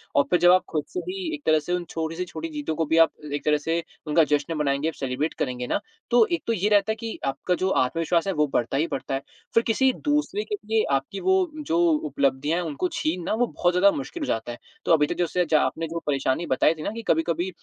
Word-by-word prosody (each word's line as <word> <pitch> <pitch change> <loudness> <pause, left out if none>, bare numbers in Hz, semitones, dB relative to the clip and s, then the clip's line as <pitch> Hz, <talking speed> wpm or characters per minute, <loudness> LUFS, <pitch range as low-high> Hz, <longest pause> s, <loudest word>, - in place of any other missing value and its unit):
और 140 - +5
फिर 175 - +3
जब 175 - +6
आप 185 0 +5
खुद 155 -2 -1
से 365 - -1
भी 365 -3 -3
एक 290 - -11
तरह 155 0 +4
से 175 +4 -4
उन 180 -1 -1
छोटी 160 0 -3
से 180 +2 -3
छोटी 330 - -4
जीतों 295 - -3
को 160 +1 0
भी 160 +2 +1
आप 165 0 +6 0.2
एक 145 - -3
तरह 150 0 +4
से 165 +3 -1 0.2
उनका 160 +2 +4
जश्न 150 +2 0
मनाएँगे 145 +2 0
सेलिब्रेट 135 +4 -2
करेंगे 125 -3 -2
ना, - - 0 0.3
तो 240 -2 +6
एक 340 - -1
तो 230 - +2
ये 210 0 0
रहता 205 +1 +3
है - - -1
कि 225 -1 -5
आपका 155 +6 -1
जो 185 +1 0
आत्मविश्वास 165 +5 +1
है 195 - +1
वो 150 -2 +2
बढ़ता 120 +3 0
ही 160 +4 +1
बढ़ता 135 - -3
है। 135 - -3 0.3
फिर 230 - +4
किसी 260 +4 +3
दूसरे 300 +8 0
के 420 - -3
लिए 220 0 +2
आपकी 135 +8 -1
वो 375 0 +3 0.3
जो 165 - +1 0.3
उपलब्धियाँ 145 +5 0
हैं, 175 - -3
उनको 155 +4 -1
छीनना 175 +5 -1
वो 240 +2 +1
बहुत 175 0 0
ज़्यादा 195 +2 +5
मुश्किल 295 +4 -5
हो - - -3
जाता 115 +2 -2
है। 120 - -7 0.3
तो - - +1
अभी 150 -2 +5
तक - - -3
जैसे 175 0 +1
जा 155 -2 +5
आपने 165 0 -1
जो 165 +1 -4
परेशानी 140 +3 0
बताई 130 +4 +3
थी 155 -1 -9
ना - - -2
कि 230 - -6
कभी-कभी 170 +3 +1
165 Hz, 255 wpm, -25 LUFS, 150-210 Hz, 0.3 s, जब